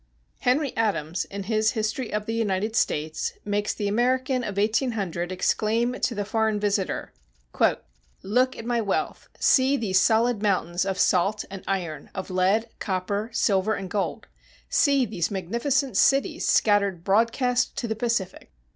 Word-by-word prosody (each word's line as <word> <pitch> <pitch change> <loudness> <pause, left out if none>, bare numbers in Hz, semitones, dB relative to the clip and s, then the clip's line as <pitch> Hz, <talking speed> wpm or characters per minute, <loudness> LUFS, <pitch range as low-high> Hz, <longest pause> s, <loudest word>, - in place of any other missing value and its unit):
Henry 265 +2 +1
Adams, 175 -7 -1
in 200 0 -6
his 215 +1 +1
History 220 +2 -2
of 210 0 -2
the 225 - -3
United 215 -1 -1
States, 155 -6 -1
makes 205 0 0
the 205 - -3
American 255 +4 +1
of 200 -3 -5
1800 205 -5 0
exclaim 220 +6 0
to 235 - 0
the 205 0 -2
foreign 220 0 0
visitor, 205 -2 -1 1.1
"Look 250 +6 +1
at 225 - -7
my 240 -1 0
wealth! 200 -3 -2
See 270 +1 +4
these 190 -6 +2
solid 230 -1 +2
mountains 185 -3 0
of 190 -1 -1
salt 195 +4 +2
and 195 -1 -7
iron, 180 -5 -3
of 190 0 -5
lead, 195 +5 +2
copper, 200 +3 -2
silver, 210 -2 +1
and 190 -2 -6
gold. 200 -2 -2 0.4
See 280 -3 +3
these 180 -7 -2
magnificent 235 - -1
cities 275 +7 +2
scattered 200 -5 +2
broadcast 230 +5 +1
to 235 - -2
the 220 - -2
Pacific! 220 -5 -2
210 Hz, 145 wpm, -25 LUFS, 190-235 Hz, 1.1 s, See